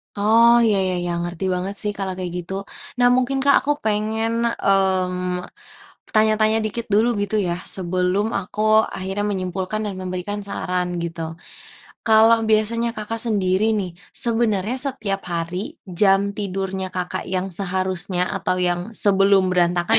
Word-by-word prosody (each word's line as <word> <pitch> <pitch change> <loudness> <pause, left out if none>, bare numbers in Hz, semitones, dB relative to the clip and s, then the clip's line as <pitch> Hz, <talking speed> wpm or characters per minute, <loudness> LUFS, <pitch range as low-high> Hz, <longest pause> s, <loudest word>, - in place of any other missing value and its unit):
Oh 230 +3 +5
ya 225 -3 +3
ya 185 -1 -1
ya, 175 0 -2
ngerti 175 +2 -4
banget 185 +2 -2
sih 210 - 0
kalau 195 -1 -3
kayak 180 -2 -4
gitu. 195 +3 -6 0.3
Nah 245 - +5
mungkin 270 +1 0
Kak, 280 +1 +4
aku 295 - +1
pengen, 220 +1 -1
mmm, 185 -4 +1 0.8
tanya-tanya 215 0 +3
dikit 230 +2 -3
dulu 225 +3 +3
gitu 205 +1 -2
ya 175 -3 -1
sebelum 185 +2 -1
aku 215 +3 +2
akhirnya 195 +2 -3
menyimpulkan 190 +1 -3
dan 195 - -5
memberikan 185 +2 -4
saran 180 -3 -3
gitu. 165 0 -5 0.7
Kalau 225 0 +5
biasanya 230 +2 +1
Kakak 220 +1 -5
sendiri 210 -1 +2
nih, 190 -4 -2 0.2
sebenernya 225 -1 +1
setiap 220 -8 +1
hari 180 - -4 0.2
jam 195 +2 +3
tidurnya 190 -2 -4
Kakak 180 -1 -4
yang 185 +1 -2
seharusnya 185 -1 -1
atau 190 -2 -1
yang 175 +5 -1
sebelum 195 -2 +4
berantakan 175 -1 +3
195 Hz, 140 wpm, -21 LUFS, 185-220 Hz, 0.8 s, Oh